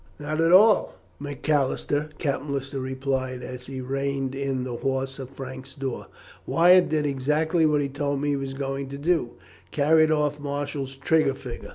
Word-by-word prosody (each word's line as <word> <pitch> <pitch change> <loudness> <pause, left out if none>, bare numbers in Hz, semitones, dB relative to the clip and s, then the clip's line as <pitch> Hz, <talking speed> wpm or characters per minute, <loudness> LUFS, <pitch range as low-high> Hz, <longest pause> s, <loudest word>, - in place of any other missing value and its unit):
"Not 155 +2 -2
at 165 +1 +3
all, 205 +3 +6 0.2
Macalister," 145 +1 -1
Captain 145 -1 -2
Lister 135 0 -3
replied, 130 -1 -2
as 125 0 -8
he 130 -1 -5
reined 135 0 -2
in 135 -2 -2
the 125 -2 -4
horse 135 +1 -2
at 130 -2 -6
Frank's 130 0 -8
door. 135 -3 -4 0.4
"Wyatt 180 +2 +5
did 155 -1 +1
exactly 150 +4 +1
what 150 -1 +2
he 140 - 0
told 140 0 -2
me 145 +1 -1
he 145 - +2
was 135 -1 -4
going 135 0 -3
to 140 - -6
do 145 -5 0 0.4
carried 155 +2 +4
off 150 -1 +1
Marshall's 140 -1 -4
trigger 140 -1 +2
finger. 125 -3 -8
140 Hz, 170 wpm, -25 LUFS, 135-150 Hz, 0.4 s, all